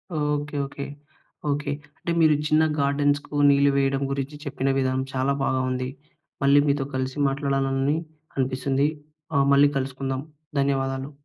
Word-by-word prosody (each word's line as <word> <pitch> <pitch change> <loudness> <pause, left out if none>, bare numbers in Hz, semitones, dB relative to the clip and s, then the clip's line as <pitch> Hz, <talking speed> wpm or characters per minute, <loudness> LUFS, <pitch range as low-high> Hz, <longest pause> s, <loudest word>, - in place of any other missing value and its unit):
Okay, 150 0 -1
okay. 140 +1 -6 0.6
Okay. 145 0 -1 0.3
అంటే 170 - -3
మీరు 155 -2 +6
చిన్న 155 +1 +4 0.2
గార్డెన్స్‌కు 145 +1 +1
నీళ్లు 140 0 +5
వేయడం 135 0 +1
గురించి 140 +2 -3
చెప్పిన 135 -1 -1
విధానం 130 0 +1
చాలా 135 +1 +1
బాగా 130 -1 +1
ఉంది. 130 0 -2 0.5
మళ్ళీ 140 +1 +6
మీతో 140 -1 +1
కలిసి 130 +1 -2
మాట్లాడాలని 135 +1 0 0.4
అనిపిస్తుంది. 135 +2 +1 0.5
ఆహ్, 140 0 +4
మళ్ళీ 140 +1 +6
కలుసుకుందాం. 135 0 -3 0.4
ధన్యవాదాలు. 135 0 0
140 Hz, 130 wpm, -25 LUFS, 135-145 Hz, 0.6 s, మీరు